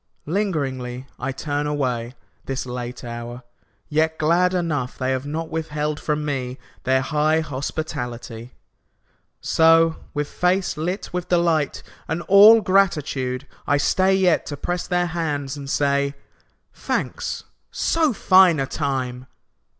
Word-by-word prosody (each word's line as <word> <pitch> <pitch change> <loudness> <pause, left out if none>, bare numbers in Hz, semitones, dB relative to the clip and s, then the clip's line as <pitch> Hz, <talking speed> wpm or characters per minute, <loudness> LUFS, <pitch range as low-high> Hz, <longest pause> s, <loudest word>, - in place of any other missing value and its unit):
Lingeringly 135 -9 -2
I 135 - -2
turn 145 +2 -2
away, 125 -4 -2 0.3
This 135 -1 -3
late 125 0 -6
hour, 120 +1 -7 0.4
yet 160 +1 +1
glad 170 +4 +3
enough 150 -8 -2
They 130 0 -1
have 130 +1 -2
not 160 +2 -4
withheld 150 -2 -2
from 150 -1 -2
me 130 -3 -3 0.3
Their 130 +1 +3
high 155 +3 +1
hospitality. 125 -5 -5 0.9
So, 165 0 +4 0.2
with 145 0 -1
face 180 +3 0
lit 175 +6 -3
with 180 -1 -3
delight 170 -4 +1 0.2
And 160 +2 -2
all 210 +4 +8
gratitude, 150 -9 +1 0.2
I 145 - +3
stay 190 +6 +3
Yet 185 -3 +2
to 145 - -5
press 175 +5 -3
their 180 -1 +1
hands 150 -5 -2
and 140 -1 -8
say, 140 0 +1 0.6
"Thanks. - - -3 0.3
So 320 -3 +1
fine 185 - +5
a 135 - +1
time 130 -3 -3
150 Hz, 125 wpm, -22 LUFS, 130-170 Hz, 0.9 s, all